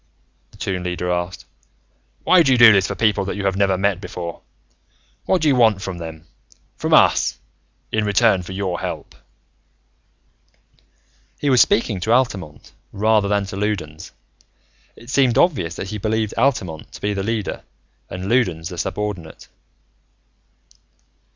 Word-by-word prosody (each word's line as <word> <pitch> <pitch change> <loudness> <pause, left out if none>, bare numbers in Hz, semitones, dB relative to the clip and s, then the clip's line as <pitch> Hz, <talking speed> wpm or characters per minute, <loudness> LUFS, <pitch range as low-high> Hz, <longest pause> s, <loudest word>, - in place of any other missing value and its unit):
the - - -20
Toon 90 -2 -3
Leader 90 0 -2
asked. 90 +1 -3 0.8
"Why 185 -1 +5
do 140 -5 +3
you 130 - +4
do 120 -2 +9
this 95 -1 +3
for - - -4
people 110 -3 +1
that 100 - -4
you 100 -1 -4
have 95 -1 +1
never 95 -1 +2
met 100 -1 0
before? 85 -4 -7 0.8
What 185 -3 +1
do - - +3
you 140 - +4
want 110 -5 +3
from 95 -2 -5
them 80 -1 -8 0.5
from - - -4
us - - +4 0.5
in 110 - 0
return 105 -1 +3
for 90 - -9
your 95 -2 -3
help?" - - -6 2.3
He 145 - +1
was 125 - +6
speaking 110 -4 +2
to 110 +5 -2
Altamont, 100 - -1 0.2
rather 105 0 +2
than 100 0 0
to 95 - -7
Loudons. 95 -7 -4 0.8
It 120 +2 -12
seemed 130 -4 +3
obvious 95 - +2
that 95 - -6
he 105 - -4
believed 110 +1 -1
Altamont 115 - -1
to - - -11
be 105 0 -1
the 100 - -3
leader 110 0 -3 0.5
and 90 +1 -6
Loudons 90 -9 0
the 90 -2 -7
subordinate. 100 -6 -5
100 Hz, 150 wpm, -20 LUFS, 90-110 Hz, 2.3 s, do